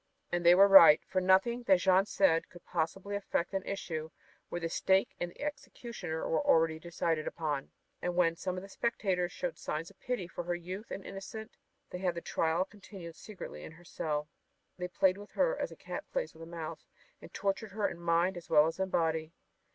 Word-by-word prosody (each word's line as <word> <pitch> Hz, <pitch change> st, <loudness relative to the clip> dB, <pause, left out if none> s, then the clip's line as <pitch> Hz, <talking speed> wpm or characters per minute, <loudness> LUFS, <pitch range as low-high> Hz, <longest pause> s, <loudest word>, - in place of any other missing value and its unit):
And 175 Hz, 0 st, 0 dB
they 175 Hz, +1 st, +8 dB
were 195 Hz, +2 st, +8 dB
right, 170 Hz, -6 st, +10 dB
for 185 Hz, 0 st, 0 dB
nothing 190 Hz, +6 st, +3 dB
that 190 Hz, -, +7 dB
Jeanne 190 Hz, +2 st, +4 dB
said 165 Hz, -6 st, +2 dB
could 175 Hz, -, -15 dB
possibly 185 Hz, +4 st, -2 dB
affect 195 Hz, -3 st, -2 dB
an 195 Hz, -, 0 dB
issue 160 Hz, -5 st, -4 dB, 0.4 s
where 175 Hz, -, -3 dB
the 165 Hz, -, -2 dB
stake 190 Hz, +3 st, +2 dB
and 175 Hz, -, -2 dB
the -, -, -15 dB
executioner 235 Hz, -, -5 dB
were 160 Hz, -, +1 dB
already 160 Hz, -1 st, +3 dB
decided 165 Hz, -1 st, -1 dB
upon. 150 Hz, -4 st, -2 dB, 0.3 s
And 180 Hz, 0 st, -2 dB
when 170 Hz, -2 st, +3 dB
some 185 Hz, +2 st, -3 dB
of 185 Hz, -, -5 dB
the -, -, -9 dB
spectators 190 Hz, -5 st, -1 dB
showed 175 Hz, -2 st, -4 dB
signs 155 Hz, +3 st, -4 dB
of -, -, -25 dB
pity 245 Hz, -8 st, -3 dB
for 175 Hz, -, -6 dB
her 175 Hz, 0 st, 0 dB
youth 185 Hz, +5 st, -7 dB
and 195 Hz, -, -6 dB
innocence 195 Hz, +3 st, -8 dB, 0.4 s
they 180 Hz, -, -5 dB
had 180 Hz, -2 st, 0 dB
the 170 Hz, -, -4 dB
trial 165 Hz, +3 st, +1 dB
continued 190 Hz, -4 st, -11 dB
secretly 185 Hz, -, -9 dB
in -, -, -9 dB
her 175 Hz, +2 st, -17 dB
cell. 150 Hz, -2 st, -2 dB, 0.5 s
They 180 Hz, 0 st, -4 dB
played 185 Hz, +1 st, +2 dB
with 205 Hz, -, -12 dB
her -, -, +2 dB
as -, -, -3 dB
a -, -, -9 dB
cat -, -, -6 dB
plays -, -, -2 dB
with 160 Hz, -, -15 dB
a 165 Hz, -, -8 dB
mouse 165 Hz, -2 st, -7 dB, 0.3 s
and -, -, -12 dB
tortured 200 Hz, +1 st, -2 dB
her 210 Hz, -1 st, +1 dB
in 170 Hz, -, -7 dB
mind 170 Hz, +2 st, +2 dB
as 170 Hz, -, -10 dB
well 150 Hz, -2 st, +6 dB
as 165 Hz, +3 st, -3 dB
in 190 Hz, 0 st, 0 dB
body. 160 Hz, -2 st, 0 dB
180 Hz, 210 wpm, -32 LUFS, 165-195 Hz, 0.5 s, right